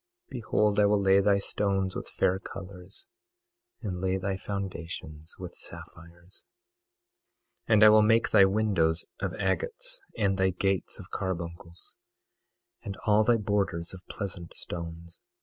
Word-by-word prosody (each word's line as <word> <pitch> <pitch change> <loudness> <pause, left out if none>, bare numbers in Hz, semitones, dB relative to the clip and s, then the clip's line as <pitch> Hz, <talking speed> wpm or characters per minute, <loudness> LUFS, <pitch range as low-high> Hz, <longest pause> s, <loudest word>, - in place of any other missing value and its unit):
Behold, 105 -3 +1
I 105 - +6
will 105 0 +3
lay 95 0 +5
thy 100 0 +4
stones 100 -1 0
with - - -5
fair 95 +1 +1
colors, 95 0 -8 0.8
and 90 -4 -3
lay 95 0 +1
thy 95 0 -2
foundations 85 -5 -5
with 90 -1 -7
sapphires. 85 +2 -9 1.2
22:12 - - +3
And 105 - +6
I 105 - +10
will 110 0 +7
make 115 +2 +3
thy 100 - +7
windows 95 -5 +1
of - - -2
agates, - - -2 0.2
and 95 -2 +1
thy 95 0 +4
gates 95 0 -1
of - - -12
carbuncles, 85 -2 -5 0.9
and 100 -4 -6
all 105 0 +5
thy 120 +1 +4
borders 100 -5 -1
of 95 - -9
pleasant 90 -4 -5
stones. 85 0 -7
95 Hz, 140 wpm, -28 LUFS, 90-105 Hz, 1.2 s, I